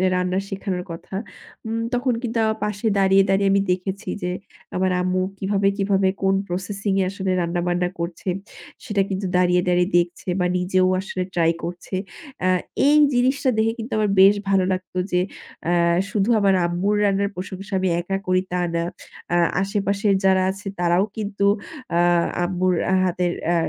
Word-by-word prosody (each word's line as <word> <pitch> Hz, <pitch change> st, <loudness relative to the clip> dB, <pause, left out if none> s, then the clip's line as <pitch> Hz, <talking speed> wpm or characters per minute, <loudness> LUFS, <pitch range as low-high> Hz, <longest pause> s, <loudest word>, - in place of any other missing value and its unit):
রান্না 180 Hz, 0 st, 0 dB
শেখানোর 190 Hz, -2 st, -3 dB
কথা। 165 Hz, +3 st, -8 dB, 0.5 s
উম 225 Hz, +1 st, -2 dB
তখন 250 Hz, +1 st, +1 dB
কিন্তু 235 Hz, -1 st, -2 dB
আমার 220 Hz, 0 st, 0 dB
পাশে 210 Hz, +2 st, -2 dB
দাঁড়িয়ে, 195 Hz, 0 st, +5 dB
দাঁড়িয়ে, 195 Hz, 0 st, +3 dB
আমি 200 Hz, 0 st, +3 dB
দেখেছি 190 Hz, +3 st, -3 dB
যে 180 Hz, -, -1 dB, 0.4 s
আমার 185 Hz, 0 st, +1 dB
আম্মু 185 Hz, 0 st, 0 dB, 0.2 s
কিভাবে, 195 Hz, 0 st, 0 dB
কিভাবে, 195 Hz, -1 st, +2 dB
কোন 195 Hz, 0 st, +3 dB
processing 195 Hz, +2 st, -2 dB
এ -, -, +3 dB
আসলে 195 Hz, -1 st, -3 dB
রান্নাবান্না 175 Hz, +1 st, 0 dB
করছে 170 Hz, +2 st, -4 dB, 0.6 s
সেটা 205 Hz, -2 st, +1 dB
কিন্তু 195 Hz, 0 st, -2 dB
দাঁড়িয়ে, 180 Hz, 0 st, +3 dB
দাঁড়িয়ে, 180 Hz, +1 st, +2 dB
দেখছে 175 Hz, +1 st, -1 dB
বা 180 Hz, -, +2 dB
নিজেও 185 Hz, +1 st, +2 dB
আসলে 185 Hz, -1 st, -3 dB
try 165 Hz, -1 st, +3 dB
করছে। 175 Hz, +2 st, -5 dB, 0.5 s
আ -, -, +3 dB, 0.4 s
এই 295 Hz, -, +5 dB, 0.2 s
জিনিসটা 260 Hz, +3 st, +2 dB
দেখে 220 Hz, +1 st, +2 dB
কিন্তু 230 Hz, +3 st, -6 dB
আমার 210 Hz, -1 st, +1 dB
বেশ 195 Hz, +2 st, +7 dB
ভালো 195 Hz, -1 st, +3 dB
লাগতো 185 Hz, 0 st, -6 dB
যে 180 Hz, -, +3 dB, 0.5 s
আ -, -, +2 dB, 0.4 s
শুধু 205 Hz, +1 st, +1 dB
আমার 195 Hz, -2 st, +3 dB
আম্মুর 180 Hz, +4 st, 0 dB
রান্নার 200 Hz, 0 st, +1 dB
প্রশংসা 190 Hz, +2 st, -7 dB
আমি 185 Hz, 0 st, +1 dB
একা 195 Hz, +2 st, -2 dB
করি 185 Hz, 0 st, +3 dB
তা 180 Hz, 0 st, 0 dB
না, 170 Hz, 0 st, 0 dB, 0.5 s
অ্যা 175 Hz, -, +3 dB, 0.2 s
আশেপাশের 200 Hz, 0 st, +1 dB
যারা 190 Hz, -1 st, +4 dB
আছে 195 Hz, +1 st, -9 dB
তারাও 175 Hz, +2 st, +3 dB
কিন্তু 200 Hz, -2 st, -2 dB, 0.5 s
আ -, -, +3 dB, 0.4 s
আম্মুর 185 Hz, +1 st, +1 dB, 0.3 s
হাতের 180 Hz, -1 st, 0 dB, 0.2 s
আ -, -, +2 dB
190 Hz, 160 wpm, -22 LUFS, 180-200 Hz, 0.6 s, বেশ